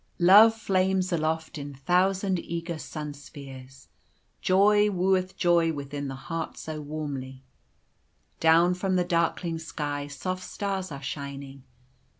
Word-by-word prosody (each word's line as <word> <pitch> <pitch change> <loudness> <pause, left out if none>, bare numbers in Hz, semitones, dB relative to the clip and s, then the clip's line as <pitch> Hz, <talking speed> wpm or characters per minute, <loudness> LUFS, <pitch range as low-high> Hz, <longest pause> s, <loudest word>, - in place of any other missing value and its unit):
"Love 205 +5 +7
flames 190 -3 +1
aloft 160 0 -1
in 140 -1 -7
thousand 185 +5 +1
eager 170 -1 -5
sunspheres, 140 -4 -9 0.5
Joy 205 +2 +4
wooeth 185 -1 0
joy 170 -2 +3
within 140 0 -5
the 135 - -5
heart 165 +4 -5
so 155 -1 -6
warmly: 140 -3 -6 1.0
Down 165 +2 +5
from 185 +1 -1
the 180 - +3
darkling 170 -1 0
sky 145 -3 -4
soft 185 +6 -4
stars 195 -3 -4
are 140 0 -7
shining. 140 -1 -6
165 Hz, 120 wpm, -27 LUFS, 145-185 Hz, 1.0 s, Love